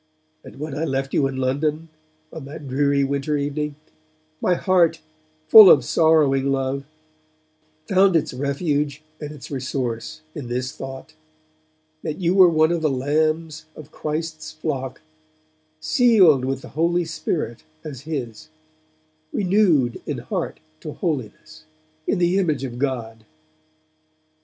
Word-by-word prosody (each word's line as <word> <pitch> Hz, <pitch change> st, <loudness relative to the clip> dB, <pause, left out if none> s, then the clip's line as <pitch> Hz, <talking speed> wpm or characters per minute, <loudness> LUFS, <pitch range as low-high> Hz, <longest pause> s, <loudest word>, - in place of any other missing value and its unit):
And -, -, -13 dB
when 150 Hz, -2 st, -5 dB
I 155 Hz, -, -2 dB
left 135 Hz, -3 st, -2 dB
you 140 Hz, -, +2 dB
in 135 Hz, -1 st, -5 dB
London, 150 Hz, +5 st, -1 dB, 0.4 s
on 160 Hz, -4 st, -8 dB
that 145 Hz, +1 st, -9 dB
dreary 140 Hz, +1 st, +1 dB
winter 140 Hz, +2 st, -1 dB
evening, 145 Hz, +1 st, -3 dB, 0.7 s
my 180 Hz, -, +2 dB
heart, 175 Hz, -3 st, +2 dB, 0.5 s
full 215 Hz, -4 st, +10 dB
of 135 Hz, -4 st, +6 dB
sorrowing 145 Hz, -4 st, +3 dB
love, 135 Hz, 0 st, -2 dB, 1.0 s
found 190 Hz, -1 st, +4 dB
its 155 Hz, -3 st, +1 dB
refuge 145 Hz, +2 st, -2 dB, 0.2 s
and 150 Hz, -1 st, -6 dB
its 150 Hz, -1 st, -11 dB
resource 130 Hz, +2 st, -4 dB
in 140 Hz, -5 st, -7 dB
this 125 Hz, +1 st, -3 dB
thought, 135 Hz, +3 st, -9 dB, 0.9 s
that 150 Hz, -, -4 dB
you 175 Hz, -1 st, +1 dB
were 190 Hz, -2 st, +7 dB
one 160 Hz, 0 st, +3 dB
of 170 Hz, -1 st, -1 dB
the 155 Hz, -, +2 dB
lambs 155 Hz, +3 st, -1 dB
of 155 Hz, 0 st, -12 dB
Christ's 155 Hz, +1 st, -4 dB
flock; 135 Hz, -5 st, -4 dB, 0.8 s
sealed 185 Hz, -, +4 dB
with 135 Hz, 0 st, -3 dB
the -, -, -10 dB
Holy 170 Hz, +4 st, 0 dB
Spirit 155 Hz, -, -3 dB, 0.2 s
as 135 Hz, -5 st, -8 dB
His; 135 Hz, -8 st, -6 dB, 0.8 s
renewed 180 Hz, -, +2 dB
in -, -, -2 dB
heart -, -, -4 dB, 0.2 s
to 150 Hz, -, -7 dB
holiness, 155 Hz, -, -5 dB, 0.4 s
in -, -, +1 dB
the 175 Hz, +2 st, +2 dB
image 155 Hz, -8 st, 0 dB
of 120 Hz, -2 st, -6 dB
God. 115 Hz, -5 st, -3 dB
150 Hz, 135 wpm, -22 LUFS, 135-160 Hz, 1.0 s, full